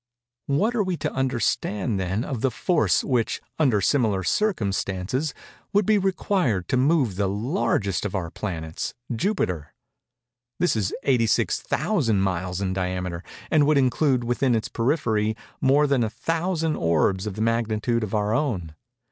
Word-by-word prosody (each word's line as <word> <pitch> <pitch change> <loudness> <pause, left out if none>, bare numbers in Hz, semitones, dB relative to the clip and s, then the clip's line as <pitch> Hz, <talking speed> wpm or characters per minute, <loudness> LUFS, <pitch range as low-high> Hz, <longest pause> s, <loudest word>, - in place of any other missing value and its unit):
What 200 +12 +1
are 235 - +1
we 185 -3 -1
to - - -3
understand, 120 -5 0
then, 95 +4 -1
of 130 -5 -4
the 135 - +2
force, 155 - +1
which 125 -4 0 0.2
under 125 -10 +3
similar 105 -4 +2
circumstances, 105 - 0 0.4
would 205 0 +3
be 215 0 +4
required 185 - 0
to - - +2
move 130 - +2
the 100 -1 +1
largest 105 - 0
of 105 -1 -3
our 85 -4 -3
planets, 80 -5 -4 0.2
Jupiter? 95 - -1 0.8
This 175 - +2
is 105 -3 0
86,000 125 - +1
miles 95 -1 -1
in 95 -1 -1
diameter, 90 -2 -3 0.3
and 150 -3 +4
would 155 -1 +4
include 130 -1 +2
within 120 +1 +1
its 110 - -2
periphery 110 -4 0 0.3
more 140 +3 +4
than 140 -4 +2
a 110 - 0
thousand 165 - -1
orbs 95 +4 +1
of 100 - -4
the 110 - -4
magnitude 115 0 0
of 105 0 -3
our 105 0 +1
own. 105 - -1
115 Hz, 150 wpm, -24 LUFS, 95-145 Hz, 0.8 s, be